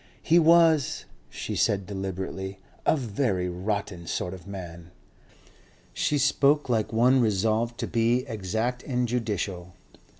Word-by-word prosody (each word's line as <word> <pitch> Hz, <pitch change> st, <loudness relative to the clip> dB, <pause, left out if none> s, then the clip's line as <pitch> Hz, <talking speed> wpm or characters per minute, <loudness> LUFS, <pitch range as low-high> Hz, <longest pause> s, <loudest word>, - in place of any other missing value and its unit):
"He 170 Hz, +1 st, +5 dB
was," 165 Hz, -3 st, +4 dB, 0.2 s
she -, -, -5 dB
said 100 Hz, -2 st, +1 dB
deliberately, 95 Hz, 0 st, -5 dB, 0.3 s
"a -, -, +4 dB
very 110 Hz, -7 st, -1 dB
rotten 90 Hz, -1 st, -3 dB
sort 90 Hz, -, -2 dB
of 90 Hz, 0 st, -11 dB
man." 85 Hz, -4 st, -8 dB, 1.0 s
She 150 Hz, -, 0 dB
spoke 145 Hz, +1 st, +3 dB
like 115 Hz, -4 st, 0 dB
one 125 Hz, +3 st, +4 dB
resolved 110 Hz, +2 st, +1 dB
to -, -, -2 dB
be 120 Hz, +2 st, +1 dB
exact 110 Hz, +4 st, -2 dB
and 125 Hz, -2 st, -1 dB
judicial. 100 Hz, -7 st, -3 dB
110 Hz, 125 wpm, -26 LUFS, 95-125 Hz, 1.0 s, He